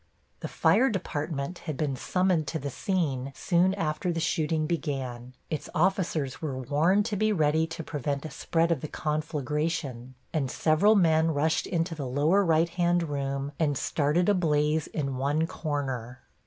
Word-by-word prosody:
The - - -4
fire 265 - +3
department 155 -4 -3
had 150 - -3
been 145 -4 -1
summoned 180 +2 +1
to 160 - -2
the 140 -1 -4
scene 140 -7 -1
soon 185 +1 +2
after 165 -1 -1
the 165 - -2
shooting 160 -1 0
began; 130 -6 -3 0.2
its 155 - -3
officers 170 - 0
were 145 -5 -3
warned 155 - +2
to 220 -2 -2
be 215 +2 +2
ready 160 -3 +2
to 160 0 -6
prevent 145 -1 -3
a 155 - -6
spread 165 +3 0
of 155 -6 0
the 155 - -4
conflagration, 150 -4 -2 0.2
and 145 -5 0
several 160 +10 +3
men 165 -4 +4
rushed 155 +3 +1
into 165 -1 -1
the 145 -4 -4
lower 150 +10 +3
right 165 -1 +3
hand 175 0 +1
room 140 0 -2
and 145 -4 +1
started 155 +6 +1
a 205 - +5
blaze 155 -3 +1
in 140 -4 -3
one 145 +4 +1
corner. 135 -7 -4
155 Hz, 165 wpm, -28 LUFS, 140-170 Hz, 0.2 s, a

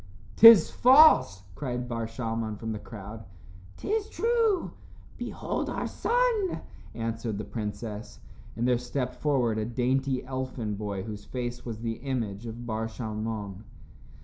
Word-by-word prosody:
"'Tis 225 -6 +9
false," 255 - +6
cried 125 +1 -4
Bar 115 -2 -3
Shalmon 115 -2 -3
from 110 +1 -5
the 105 - -4
crowd. 105 +1 -9 0.5
"'Tis 430 0 -2
true. 455 -5 +1 0.5
Behold - - -3
our - - -3
son," 470 -6 0 0.3
answered 115 -2 -3
the 105 - -4
princess, 105 +1 -6 0.4
and 120 +2 0
there 125 -1 +3
stepped 125 0 -3
forward 125 -6 +1
a 110 - -1
dainty 130 +2 0
elfin 130 -4 -4
boy 100 -2 -4
whose 105 -1 -7
face 120 -1 -5
was 115 -2 -5
the 115 -1 -3
image 120 -5 -3
of 115 +1 -7
Bar 110 -1 -2
Shalmon. 110 -3 -5
115 Hz, 135 wpm, -28 LUFS, 110-130 Hz, 0.5 s, Tis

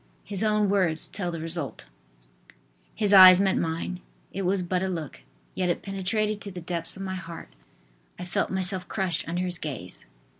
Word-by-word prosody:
His 200 -1 -3
own 210 -1 +2
words 185 -5 +1
tell 180 -4 -3
the 165 -1 -5
result: 165 - -4 1.1
"His 205 -2 +3
eyes 185 -1 +10
met 195 -1 +2
mine. 165 +2 -2 0.3
It 195 - -3
was 190 0 +1
but 180 +1 -1
a 190 - 0
look, 165 -6 -5 0.3
yet 185 -1 -1
it 175 - -1
penetrated 205 +2 -1
to 200 - -6
the 180 -2 -7
depths 170 +1 -4
of 195 - -6
my 190 -1 -4
heart, 170 - -8 0.7
I 180 - -6
felt 175 - -1
myself 185 -1 -2
crushed 185 -4 -2
under 175 +2 -1
his 180 -1 -1
gaze." 115 - -6
185 Hz, 180 wpm, -26 LUFS, 170-195 Hz, 1.1 s, eyes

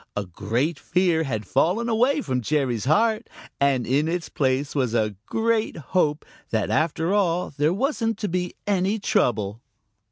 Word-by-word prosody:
A 105 - -2
great 115 - -2
fear 180 -3 +1
had 110 -6 -3
fallen 180 - +1
away 245 +6 +2
from 130 - -1
Jerry's 130 -4 0
heart, 220 - +2 0.3
and 135 -3 +2
in 140 +5 +1
its 170 0 -2
place 135 +1 0
was 125 -5 0
a 110 -2 +1
great 225 -3 0 0.2
hope 150 -5 +2 0.2
that 110 -2 0
after 160 +3 +1
all 180 -5 +1
there 150 +2 +2
wasn't 225 - 0
to 210 - -2
be 180 0 -2
any 200 +1 +1
trouble. 110 - 0
160 Hz, 155 wpm, -24 LUFS, 130-200 Hz, 0.3 s, away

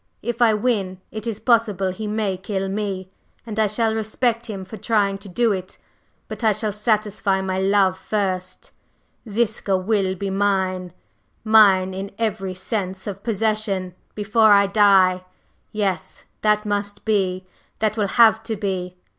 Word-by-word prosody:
If 240 +2 -3
I 225 -2 +5
win, 205 -5 -1
it 215 +1 -6
is 220 -2 -3
possible 215 -5 +2
he 215 +3 -6
may 210 -2 -1
kill 195 +1 -3
me, 195 -2 -4 0.3
and 220 -2 -5
I 215 - +4
shall 220 +2 +1
respect 230 +2 -1
him 195 -4 -6
for 200 - -9
trying 200 -2 0
to 200 0 -10
do 230 +5 +1
it. 185 -1 -5 0.5
But - - -7
I 220 -1 +4
shall 215 +1 -2
satisfy 210 -2 0
my 190 0 -2
love 195 -1 +2
first; 185 -3 -3 0.6
Ziska 215 -3 0
will 190 -1 0
be 195 +1 -4
mine 190 -2 0 0.5
mine 200 -4 +5
in 195 +1 -5
every 205 -4 -2
sense 190 0 -4
of 200 -1 -6
possession, 210 -4 -1 0.2
before 210 +1 +4
I 200 0 +5
die. 195 -3 +4 0.5
Yes, 195 -6 -3 0.2
that 210 0 +2
must 205 0 -3
be 190 -4 0 0.3
that 215 -1 0
will 210 -3 0
have 225 -1 +6
to 225 0 -4
be. 185 -3 -4
205 Hz, 155 wpm, -22 LUFS, 190-220 Hz, 0.6 s, have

